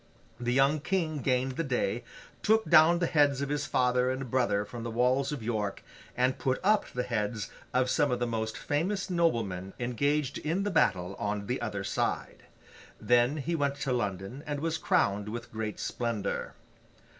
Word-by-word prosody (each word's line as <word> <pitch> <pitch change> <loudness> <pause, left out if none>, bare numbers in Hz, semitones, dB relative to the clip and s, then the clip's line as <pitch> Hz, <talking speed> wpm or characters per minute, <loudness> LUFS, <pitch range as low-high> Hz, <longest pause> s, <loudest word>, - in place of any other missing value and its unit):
The 120 0 -1
young 135 +4 +3
King 160 -1 -1
gained 130 0 0
the 165 - 0
day, 120 -4 -1 0.4
took 220 0 +3
down 170 +1 +7
the 175 - +1
heads 145 -4 +3
of 140 - -2
his 145 0 -1
father 125 0 +2
and 130 -2 -3
brother 120 -5 +1
from 120 +2 -8
the 115 - -4
walls 125 +4 +2
of 140 -6 -4
York, 105 -3 -2 0.3
and 125 +1 +1
put 130 0 0
up 210 +2 +3
the 125 - -3
heads 105 -3 -2 0.2
of 125 0 +2
some 145 +3 +2
of 125 - +1
the 120 - 0
most 110 -1 -2
famous 185 +7 -1
noblemen 110 - 0
engaged 140 +4 0
in 170 +6 -1
the 205 - -1
battle 90 - +2
on 105 0 -2
the 125 +5 -2
other 100 -1 -3
side. 100 - -2 0.6
Then, 120 +4 +3
he 155 +4 -2
went 140 -3 0
to 135 -3 0
London 105 +3 -3
and 145 -1 -2
was 160 +1 -1
crowned 105 - +1
with 120 +2 -6
great 110 -1 -4
splendour. 115 -4 -3
125 Hz, 180 wpm, -29 LUFS, 115-150 Hz, 0.6 s, down